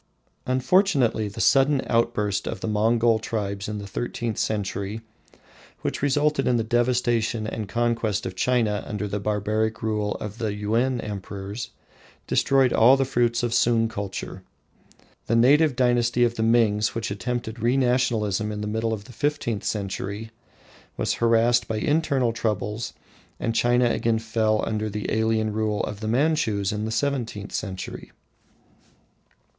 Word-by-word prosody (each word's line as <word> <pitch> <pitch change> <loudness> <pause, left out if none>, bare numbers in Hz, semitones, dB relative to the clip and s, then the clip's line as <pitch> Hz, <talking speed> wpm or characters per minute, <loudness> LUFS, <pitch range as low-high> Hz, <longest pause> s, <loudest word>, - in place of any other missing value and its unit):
Unfortunately 130 - +2
the 105 +3 -8
sudden 135 +3 +4
outburst 115 -4 0
of - - -4
the - - -3
Mongol 115 +2 +2
tribes 100 -2 -3
in 105 - -3
the 100 - -6
thirteenth 115 +2 -3
century 105 0 -2 0.8
which - - -3
resulted 145 0 +1
in 125 - +3
the 115 - 0
devastation 120 -1 +1
and 110 -2 -4
conquest 115 -3 0
of 95 - -5
China 110 -1 +1
under 105 -1 -3
the 105 +1 -3
barbaric 105 +2 -1
rule 105 -2 -1
of 105 +2 -7
the 110 -3 -2
Yuen 115 +5 0
Emperors, 100 +1 -6 0.6
destroyed 135 -2 +3
all 125 +4 +6
the 135 - +1
fruits 120 -2 +1
of 120 -1 0
Sung 115 -1 +3
culture. 100 -3 -6 0.9
The 115 - +2
native 140 +4 +5
dynasty 120 -1 +2
of 120 -1 +2
the 115 - -4
Mings 110 -2 +2
which 115 -2 -3
attempted 110 +3 -4
re 120 +3 +2
nationalisation 115 -5 +1
in 105 0 -4
the - - -3
middle 110 +1 -1
of 105 -2 -5
the 125 - -14
fifteenth 145 -7 -1
century 100 +2 -4 0.7
was - - 0
harassed 115 +1 +3
by 110 - -2
internal 140 -2 +1
troubles, 110 0 -2 0.5
and 115 - -1
China 120 +1 +3
again 115 -1 +1
fell 110 -1 0
under 110 0 -2
the 105 0 -4
alien 110 -1 +1
rule 105 -1 -1
of 105 -1 -4
the 110 - -4
Manchus 115 -6 +1
in 105 +1 -3
the 110 - -3
seventeenth 115 -4 -2
century. 95 -1 -5
115 Hz, 150 wpm, -24 LUFS, 105-120 Hz, 0.9 s, all